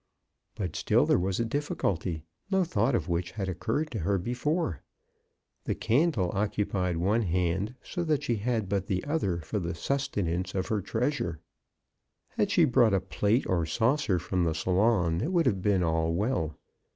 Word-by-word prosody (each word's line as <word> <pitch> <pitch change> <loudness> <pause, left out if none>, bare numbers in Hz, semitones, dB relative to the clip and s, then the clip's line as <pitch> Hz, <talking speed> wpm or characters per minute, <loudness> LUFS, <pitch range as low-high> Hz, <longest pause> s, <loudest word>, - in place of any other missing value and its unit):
But 90 -6 -4
still - - +3
there - - +3
was 95 +2 -1
a 115 - +1
difficulty, 95 - -2 0.3
no 190 -1 +3
thought 120 - +1
of - - -1
which 85 0 -2
had 100 -3 -3
occurred 115 - -2
to 110 - -3
her 100 +3 +1
before. 125 - -1 0.8
The - - -1
candle 115 - +1
occupied 100 -3 0
one 100 +7 +2
hand, 90 +4 0
so 175 - -3
that 150 -3 +1
she 120 -5 0
had 110 -1 -1
but 100 0 -1
the 95 -1 -1
other 100 - 0
for 80 +6 -3
the 85 -2 -3
sustenance 95 -6 -1
of 95 -1 -1
her 105 -2 0
treasure. 115 - -1 0.9
Had 205 - 0
she 175 -5 +5
brought 120 -6 +4
a - - +3
plate 100 +5 0
or 85 -2 +1
saucer 115 - +1
from 90 +1 -1
the 80 -2 0
salon, 90 0 +2
it 165 - -1
would 170 -3 +3
have 100 -7 +1
been 95 -2 +2
all 80 0 +1
well. 95 - -1
100 Hz, 175 wpm, -28 LUFS, 90-125 Hz, 0.9 s, she